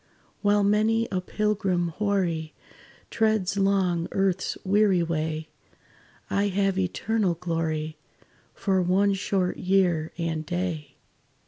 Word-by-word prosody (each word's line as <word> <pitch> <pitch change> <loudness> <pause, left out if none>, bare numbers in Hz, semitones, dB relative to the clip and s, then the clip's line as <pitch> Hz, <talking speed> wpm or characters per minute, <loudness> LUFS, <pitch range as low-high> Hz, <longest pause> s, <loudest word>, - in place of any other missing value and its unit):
"While 205 0 +3
many 215 +3 +2
a 185 -2 0
pilgrim 195 -3 0
hoary 170 -4 -1 0.6
Treads 215 -4 +1
long 190 -4 +1
earth's 190 -1 0
weary 195 -2 +3
way, 160 -1 -2 0.8
I 200 +1 +1
have 195 -1 +1
eternal 190 0 0
glory 160 -2 -3 0.6
For 190 -2 +1
one 195 +3 +3
short 190 -1 -1
year 180 -4 +1
and 165 -2 -2
day." 170 -4 -3
185 Hz, 105 wpm, -26 LUFS, 170-200 Hz, 0.8 s, While